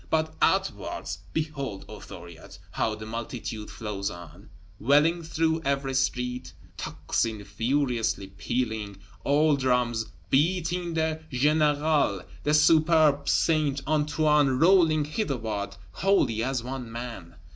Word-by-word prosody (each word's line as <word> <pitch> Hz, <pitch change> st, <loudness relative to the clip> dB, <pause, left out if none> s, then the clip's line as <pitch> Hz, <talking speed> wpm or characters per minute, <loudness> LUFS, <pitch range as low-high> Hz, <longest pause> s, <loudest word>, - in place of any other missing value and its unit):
But 160 Hz, 0 st, 0 dB
outwards, -, -, 0 dB
behold, 145 Hz, -9 st, -4 dB
O -, -, -9 dB
Thuriot, 85 Hz, -1 st, -11 dB
how 110 Hz, -, -1 dB
the 110 Hz, 0 st, -9 dB
multitude 115 Hz, -1 st, -5 dB
flows 105 Hz, -3 st, -4 dB
on, 85 Hz, +3 st, -12 dB, 0.3 s
welling 150 Hz, +8 st, +3 dB
through 160 Hz, 0 st, 0 dB
every 140 Hz, -1 st, -1 dB
street, 125 Hz, -1 st, -1 dB, 0.2 s
tocsin 110 Hz, -3 st, -2 dB
furiously 115 Hz, 0 st, 0 dB
pealing, 105 Hz, +1 st, -3 dB, 0.3 s
all 150 Hz, +2 st, +3 dB
drums 125 Hz, -4 st, 0 dB, 0.2 s
beating 170 Hz, +3 st, +1 dB
the 160 Hz, 0 st, 0 dB
générale; 150 Hz, -, +2 dB, 0.2 s
the 150 Hz, +1 st, +2 dB
suburb 155 Hz, -1 st, +4 dB
Saint 150 Hz, -4 st, +2 dB
Antoine 150 Hz, -1 st, +2 dB
rolling 165 Hz, -2 st, +4 dB
hitherward 115 Hz, -, -3 dB, 0.2 s
wholly 190 Hz, -, +1 dB
as 130 Hz, -2 st, -1 dB
one 125 Hz, -2 st, -6 dB
man! 115 Hz, -8 st, -7 dB
135 Hz, 110 wpm, -27 LUFS, 115-155 Hz, 0.3 s, suburb